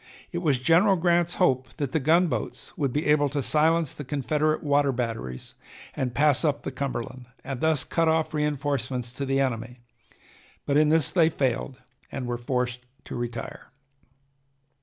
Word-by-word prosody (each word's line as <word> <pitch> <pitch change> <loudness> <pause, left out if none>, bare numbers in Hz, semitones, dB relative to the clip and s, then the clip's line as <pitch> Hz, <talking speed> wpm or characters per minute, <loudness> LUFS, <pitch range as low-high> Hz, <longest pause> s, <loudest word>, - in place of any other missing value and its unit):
It 175 - -2
was 150 -7 +2
General 175 +8 +4
Grant's 175 -1 +2
hope 130 -8 +1
that 140 -3 -3
the 160 - +1
gunboats 160 0 0
would 140 -4 -1
be 150 +4 -1
able 150 -1 +3
to 140 0 -2
silence 160 +1 +2
the 145 - -7
Confederate 150 +3 0
water 145 -1 +3
batteries 115 - -4 0.4
and 125 -3 -2
pass 145 -1 +3
up 145 -3 0
the - - -4
Cumberland, 130 -2 -5 0.2
and 130 -2 -5
thus 160 -3 +2
cut 165 -1 0
off 160 0 +1
reinforcements 140 -5 -2
to 140 +1 -4
the 135 0 +1
enemy, 125 -2 -2 0.9
but 140 - 0
in 150 0 +5
this 160 -3 +3
they 165 -3 +4
failed 130 -2 -2 0.3
and 135 - -4
were 120 0 -3
forced 125 0 -1 0.3
to - - -7
retire. 120 -1 -6
140 Hz, 160 wpm, -26 LUFS, 125-155 Hz, 0.9 s, in